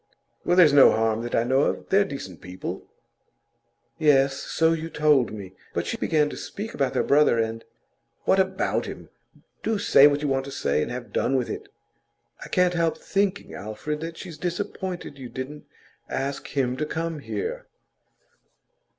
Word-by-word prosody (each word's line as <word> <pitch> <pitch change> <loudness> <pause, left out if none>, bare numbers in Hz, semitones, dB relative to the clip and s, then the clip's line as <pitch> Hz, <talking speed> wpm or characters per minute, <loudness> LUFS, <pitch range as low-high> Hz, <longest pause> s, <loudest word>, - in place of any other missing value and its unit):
'Well, 175 - +2
there's 160 -6 +7
no 140 -2 +8
harm 110 0 +1
that 120 0 -3
I 115 - +3
know 130 +3 +2
of. - - -1
They're 195 +1 +5
decent 135 - -7
people.' 90 0 -7 1.1
'Yes; 135 -3 +4
so 165 0 +2
you 165 0 -4
told 150 -6 +3
me. 100 -3 -8 0.2
But - - 0
she - - -2
began 150 -2 +2
to - - -7
speak 220 +3 -6
about 135 -2 -1
their - - +2
brother, 145 -4 +4
and 115 0 -1 0.3
' - - -47
'What 195 - +4
about 190 0 0
him? - - -9 0.5
Do 220 -1 0
say 145 -7 +7
what 145 0 0
you - - +1
want 135 -1 0
to 140 - -7
say, 75 - 0
and - - -2
have 120 0 -7
done 135 - +1
with 125 -2 0
it!' - - -7 0.7
'I - - -8
can't 180 -1 +3
help 165 -2 +1
thinking, 200 0 -1
Alfred, 110 +9 -5
that 165 0 -6
she's 170 -5 -9
disappointed 180 -4 -4
you 125 -2 -7
didn't 135 +4 -7 0.4
ask 135 +1 -3
him 130 -3 -1
to 155 - -1
come 165 0 -3
here. 470 - -4
145 Hz, 175 wpm, -25 LUFS, 125-170 Hz, 1.1 s, no